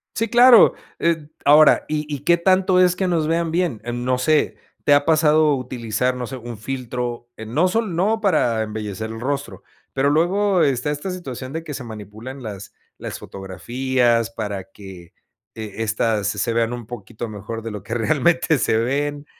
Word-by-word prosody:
Sí, 225 - 0
claro, 240 0 +7 0.3
eh, 165 -3 0 0.2
ahora, 150 +2 +6
¿y 150 0 -2
y 145 - -3
qué 170 +5 +3
tanto 185 +1 +3
es 180 -1 +4
que 190 - 0
nos 165 -3 0
vean 165 +1 0
bien? 165 -8 -1
Em, 120 0 -4
no 125 0 +1
sé, 150 +4 +1 0.3
¿te 145 - +4
ha 145 0 +4
pasado 155 -2 +4
utilizar 125 -1 -2
no 125 -1 -5
sé 135 - -6
un 120 -2 -8
filtro? 120 0 -5
Eh, 110 - -8
no 155 +12 +1
sol 215 -2 -1
no 210 +6 +1
para 150 - +1
embellecer 110 0 -5
el 115 0 -7
rostro, 140 +2 -4 0.3
pero 135 +1 +2
luego 180 +4 +2
está 140 0 0
esta 150 +6 -4
situación 135 -7 -7
de 160 0 -4
que 155 - -7
se 130 -3 -6
manipulan 110 +5 -9
las 105 -2 -8 0.2
las - - -6
fotografías 120 +4 -1
para 105 -4 -5
que, 95 -3 -13 0.4
eh, 110 -3 -7
estas 110 -1 0
se 105 - -2
se - - 0
vean 115 0 0
un 120 -3 -7
poquito 115 0 -7
mejor 110 +2 -6
de 115 - -5
lo 105 -1 -6
que 100 +4 -6
realmente 160 +6 +2
se 110 - +1
ven. 145 +5 -1
130 Hz, 185 wpm, -21 LUFS, 115-160 Hz, 0.4 s, claro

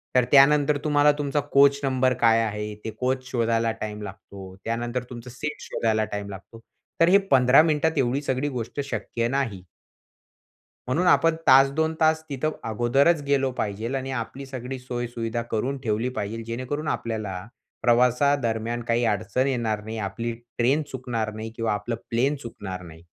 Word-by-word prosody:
तर 125 -1 +5
त्यानंतर 145 +1 +6
तुम्हाला 150 -1 +4
तुमचा 145 0 0
कोच 140 0 +6
नंबर 130 -1 +2
काय 115 -1 +5
आहे, 105 -1 -3
ते 110 - -3
कोच 130 0 -1
शोधायला 115 -1 +1
टाईम 105 0 -4
लागतो. 95 -1 -10
त्यानंतर 120 +2 -2
तुमचं 120 0 -9
सीट 150 +5 -5
शोधायला 110 -1 0
टाईम 100 -1 -5
लागतो. 100 +3 -10 0.4
तर 165 - +7
हे 195 - +7
15 130 +2 +7
मिनिटात 160 0 +1
एवढी 135 +1 +1
सगळी 140 0 -1
गोष्ट 120 +4 -5
शक्य 115 +1 -2
नाही. 120 -8 -2 1.2
म्हणून 165 +8 +1
आपण 165 -2 +4
तास, 135 +1 +7
2 160 +2 0
तास 160 0 +3
तिथं 145 +2 -1 0.2
अगोदरच 135 +8 +3
गेलो 135 -2 +2
पाहिजेल 110 +5 -2
आणि 135 0 -3
आपली 130 +2 -5
सगळी 130 0 -6
सोय 120 -1 -4
सुविधा 115 0 -3
करून 125 +5 -1
ठेवली 110 +2 0
पाहिजेल, 115 -2 -4
जेणेकरून 130 +7 -4
आपल्याला, 110 -7 -3 0.3
प्रवासा 125 +4 +4
दरम्यान 115 -2 -2
काही 120 +1 +2
अडचण 110 +4 0
येणार 115 -5 -1
नाही, 110 +1 -6
आपली 115 +3 -3 0.3
ट्रेन 130 +6 +3
चुकणार 120 -4 -3
नाही 110 +1 -6
किंवा 115 -2 0
आपलं 105 +3 -3
प्लेन 130 +5 +1
चुकणार 95 -6 -7
नाही. 80 -1 -13
120 Hz, 160 wpm, -25 LUFS, 110-135 Hz, 1.2 s, तर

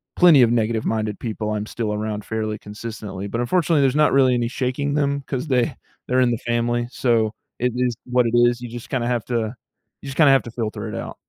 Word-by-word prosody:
plenty 170 -6 +7
of 115 -2 +5
negative-minded 110 -2 0
people 110 -2 -3
I’m 105 0 -2
still 110 -2 -3
around 105 0 -3
fairly 110 -1 -3
consistently, 105 -2 -7
but 115 - -3
unfortunately 160 +4 +2
there’s 135 0 +2
not - - +3
really 130 -2 +5
any 120 -1 0
shaking 130 +3 -2
them 140 -1 0
cause 130 +2 -3
they 125 -3 +3 0.4
they’re 130 0 +3
in 120 - +2
the 120 0 -4
family, 120 0 0
so 115 -5 +1 0.3
it 125 0 +1
is 125 -1 +1
what 125 0 +2
it 115 - -1
is, 120 0 +4
you 120 - -6
just 120 0 -8
kinda 120 -2 -1
have 120 -2 0
to 115 -2 -1 0.5
you 140 - -9
just 130 - -7
kinda 150 -4 +6
have 135 -1 +4
to 120 - -8
filter 110 -2 -4
it - - -6
out. - - -6
120 Hz, 225 wpm, -22 LUFS, 110-130 Hz, 0.5 s, plenty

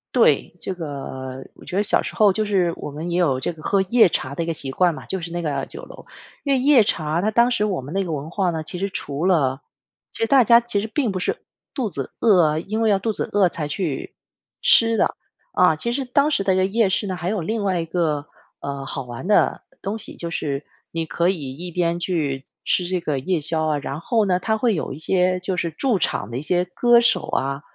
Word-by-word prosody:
对， - - +3
这 190 - -2
个 135 -5 -6
我 - - -16
觉 - - -6
得 200 - +2
小 210 - +4
时 - - -6
候 210 -3 +5
就 215 +3 -1
是 190 -4 +2
我 - - -6
们 155 +4 -5
也 175 - +1
有 145 -7 +2
这 - - -1
个 160 -2 -13
喝 195 +4 +2
夜 235 -2 +6
茶 140 -5 -2
的 165 - -2
一 - - -4
个 165 - -1
习 140 -4 -4
惯 175 +3 +2
嘛， - - -10
就 190 - -2
是 170 -1 -6
那 175 +1 -3
个 145 -4 -2
酒 - - -9
楼。 - - -12 0.4
因 280 - +1
为 265 - +3
夜 275 -2 +6
茶 155 -1 -1
它 210 - +1
当 235 +3 +4
时 210 -3 +1
我 190 -8 -1
们 140 +5 -8
那 195 - +1
个 165 - -3
文 150 +1 -4
化 185 +1 0
呢， 160 -1 -3
其 175 +3 -6
实 195 +1 -1
除 145 -4 -3
了 140 -8 +2 0.5
其 - - -8
实 - - +2
大 270 +2 +6
家 235 +2 +7
其 235 -4 -1
实 210 - -3
并 235 0 0
不 185 - -3
是 - - -1 0.4
肚 250 -6 -2
子 140 -7 -4
饿 205 -6 +5
啊 155 0 +2
因 215 +6 -3
为 225 -1 +3
要 200 - +4
肚 220 +4 -1
子 - - -2
饿 200 -3 +4
才 155 -3 -4
去 150 -2 -4 0.5
吃 230 0 +5
的， - - +2 0.4
啊， 180 -3 +4
其 235 +10 -2
实 265 +2 -2
当 280 +4 +2
时 195 -9 0
的 185 -1 +3
夜 205 +1 +2
市 200 +2 0
呢， 185 -1 -3
还 175 - -4
有 205 0 -1
另 220 +6 -2
外 185 -3 +1
一 - - -4
个， 160 -4 -1 0.4
呃， 140 -1 -5
好 135 0 -4
玩 120 +7 -7
的 210 - +3 0.2
东 210 +3 -3
西， - - -8
就 170 -1 -5
是 145 -3 -2 0.3
你 165 -1 -2
可 170 +2 0
以 145 -8 -2
一 175 +2 -6
边 170 0 0
去 150 -7 -2 0.2
吃 180 - +1
这 180 -1 -1
个 150 -4 -1
夜 165 +4 -1
宵 160 +1 +1
啊， 155 -1 +1
然 140 +1 -5
后 220 +5 +1
呢， 180 -2 +1
它 220 +4 0
会 225 -1 +2
有 155 - -3
一 - - -8
些 180 +2 +1
就 185 0 -2
是 170 - 0
驻 220 - 0
场 150 - -1
的 120 - -3
一 - - -3
些 175 +4 +1
歌 240 -1 +5
手 235 - +2
啊， 140 +1 -1
180 Hz, 275 characters per minute, -22 LUFS, 155-205 Hz, 0.5 s, 家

